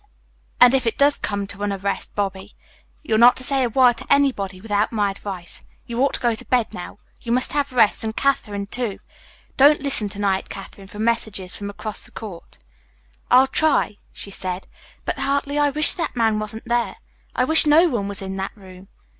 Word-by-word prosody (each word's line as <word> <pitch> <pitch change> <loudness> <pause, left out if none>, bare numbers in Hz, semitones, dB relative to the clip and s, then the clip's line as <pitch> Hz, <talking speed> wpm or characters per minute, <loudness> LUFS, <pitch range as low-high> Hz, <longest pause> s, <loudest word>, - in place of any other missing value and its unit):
"And 245 - +7
if 260 -3 +1
it 230 - -1
does 285 0 +3
come 200 -1 -2
to 200 0 -7
an 205 0 -1
arrest, 195 0 -4
Bobby, 195 0 -4 0.5
you're 220 -8 +1
not 240 +1 +7
to 260 - -5
say 270 0 +2
a 245 - 0
word 245 0 +4
to - - -10
anybody 205 -10 +1
without 210 +1 -1
my 205 -3 0
advice. 190 -3 -6 0.2
You 235 +1 -3
ought 275 - +2
to - - 0
get 235 -3 0
to - - -12
bed 245 -4 0
now. 180 0 -8 0.2
You 230 - -5
must 250 +1 +3
have 285 -1 -1
rest, 230 -5 +3
and 220 0 -4
Katherine, 210 -7 -1
too. 225 -1 -3 0.6
Don't 290 +3 +6
listen 270 -7 -1
to 200 - -7
night, 195 -2 -1
Katherine, 195 0 -10
for 205 - -12
messages 215 -4 -1
from 200 0 -6
across 210 +1 -5
the - - -9
court." 190 -7 -10 0.7
"I'll 255 +1 +6
try," 275 -6 +1
she 200 - -7
said, 185 -1 -4 0.4
"but, - - -3
Hartley, 280 +1 -1
I 290 0 +3
wish 300 +2 +6
that 330 -6 -4
man 225 -3 +1
wasn't 215 +2 -4
there. 240 0 -1 0.4
I 250 - +2
wish 315 +3 +4
no 320 +4 +6
one 235 -10 -2
was 200 0 -3
in 190 0 -5
that 195 +2 -5
room." 185 -1 -14
220 Hz, 205 wpm, -21 LUFS, 200-260 Hz, 0.7 s, And